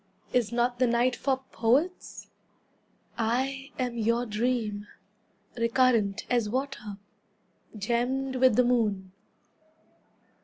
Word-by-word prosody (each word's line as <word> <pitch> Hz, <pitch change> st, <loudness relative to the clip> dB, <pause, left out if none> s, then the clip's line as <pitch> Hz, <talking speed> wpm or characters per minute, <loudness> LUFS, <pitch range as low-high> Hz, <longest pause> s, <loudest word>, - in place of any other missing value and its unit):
Is 240 Hz, -3 st, +2 dB
not 240 Hz, +1 st, 0 dB
the 255 Hz, -, +4 dB
night 240 Hz, +1 st, +2 dB
for 265 Hz, +1 st, -1 dB
poets? 275 Hz, +11 st, 0 dB, 0.9 s
I 265 Hz, +4 st, -1 dB
am 245 Hz, -2 st, -2 dB
your 230 Hz, +2 st, +1 dB
dream, 215 Hz, -2 st, -1 dB, 0.7 s
Recurrent 230 Hz, -4 st, +2 dB
as 240 Hz, -4 st, +1 dB
water, 255 Hz, -5 st, -4 dB, 0.8 s
Gemmed 250 Hz, +5 st, -1 dB
with 255 Hz, -3 st, +5 dB
the 250 Hz, -, +5 dB
moon!" 210 Hz, -6 st, 0 dB
240 Hz, 100 wpm, -28 LUFS, 225-255 Hz, 0.9 s, with